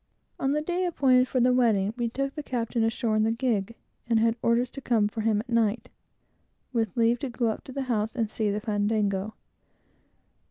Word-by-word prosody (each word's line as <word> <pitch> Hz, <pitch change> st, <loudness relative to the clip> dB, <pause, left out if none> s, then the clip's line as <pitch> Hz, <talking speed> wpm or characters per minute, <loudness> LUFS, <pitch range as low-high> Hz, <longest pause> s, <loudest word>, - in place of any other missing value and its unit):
On 270 Hz, +1 st, +1 dB
the 300 Hz, 0 st, 0 dB
day 355 Hz, +3 st, -1 dB
appointed 260 Hz, -6 st, +3 dB
for 255 Hz, -, 0 dB
the 250 Hz, +1 st, +4 dB
wedding, 220 Hz, -5 st, +2 dB
we 240 Hz, -2 st, -1 dB
took 275 Hz, +3 st, -3 dB
the 300 Hz, -, -5 dB
captain 235 Hz, -4 st, -2 dB
ashore 225 Hz, 0 st, 0 dB
in 215 Hz, -, +3 dB
the 220 Hz, -, +2 dB
gig, 230 Hz, -3 st, -1 dB, 0.3 s
and 230 Hz, -1 st, +3 dB
had 225 Hz, 0 st, +2 dB
orders 235 Hz, +2 st, +1 dB
to 275 Hz, -, -8 dB
come 225 Hz, -5 st, +2 dB
for 220 Hz, +1 st, -5 dB
him 215 Hz, -1 st, +1 dB
at 235 Hz, -, -14 dB
night, 230 Hz, 0 st, +1 dB, 0.8 s
with 225 Hz, -4 st, -1 dB
leave 230 Hz, +1 st, +3 dB
to 275 Hz, -, -4 dB
go 235 Hz, -1 st, 0 dB
up 220 Hz, -, -4 dB
to -, -, -9 dB
the 275 Hz, +1 st, -3 dB
house 225 Hz, -2 st, -1 dB
and 230 Hz, -3 st, 0 dB
see 215 Hz, 0 st, -1 dB
the 205 Hz, +1 st, -1 dB
fandango. 205 Hz, -2 st, -1 dB
230 Hz, 205 wpm, -27 LUFS, 215-255 Hz, 0.8 s, the